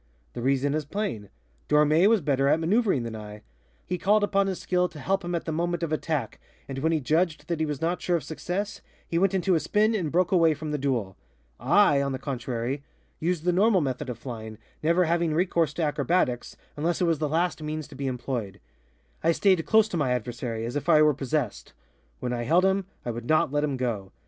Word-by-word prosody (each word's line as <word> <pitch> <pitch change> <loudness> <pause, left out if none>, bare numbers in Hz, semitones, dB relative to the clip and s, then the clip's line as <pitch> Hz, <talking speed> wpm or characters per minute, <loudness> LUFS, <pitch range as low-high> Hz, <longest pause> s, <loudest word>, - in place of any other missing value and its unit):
The 120 - -5
reason 135 +2 +1
is 155 0 -1
plain: 145 - -4 0.4
Dormé 150 +5 +5
was 225 -3 +3
better 140 -2 +1
at 150 - +3
maneuvering 190 - +2
than 115 -1 -5
I. 105 -1 -9 0.4
He 180 0 -3
called 205 +3 +3
upon 200 -1 +2
his 190 -2 -3
skill 180 -1 +1
to 155 - -13
help 195 +6 0
him 175 0 -2
at 170 - -3
the 160 - -2
moment 170 +2 -1
of 160 -2 -1
attack, 155 -6 -2 0.3
and 135 -1 -5
when 160 +4 +1
he 160 - +2
judged 155 +4 0
that 170 -2 -1
he 160 - 0
was 145 -2 -4
not 170 +2 -1
sure 175 - +1
of 155 - -6
success, 190 +7 -4 0.3
he 170 - 0
went 195 +1 +2
into 190 0 +2
a 165 - +3
spin 215 +6 +2
and 175 -9 -1
broke 180 +1 +2
away 165 -4 +4
from 155 +1 -5
the 150 - -1
duel. 120 -9 -1 0.4
I, 145 - +4
on 140 -1 -1
the - - -2
contrary, 130 0 -3 0.4
used 170 0 -1
the 180 0 +2
normal 200 +2 +4
method 135 -2 -3
of 120 - -4
flying, 110 -3 -7 0.2
never 170 +3 +3
having 165 -1 +1
recourse 170 -2 +1
to 170 - -1
acrobatics, 150 -4 0 0.2
unless 165 +4 -1
it 180 - +2
was 165 -3 +1
the 155 -1 -1
last 170 +2 0
means 155 0 -4
to - - -12
be 140 0 -3
employed. 120 -6 -4 0.6
I 165 - +4
stayed 185 0 +3
close 220 -1 +5
to 175 - -2
my 135 -5 +1
adversary, 120 -1 -3
as 120 - -5
if 145 - -2
I 155 0 +7
were 150 -1 +5
possessed. 135 -4 -3 0.5
When 125 -1 -2
I 120 -1 -2
held 170 +8 +4
him, 190 0 +1 0.2
I 120 - -1
would 120 0 -6
not 155 -3 +3
let 145 0 +1
him 145 -3 -1
go. 110 -7 -3
155 Hz, 225 wpm, -26 LUFS, 130-175 Hz, 0.6 s, I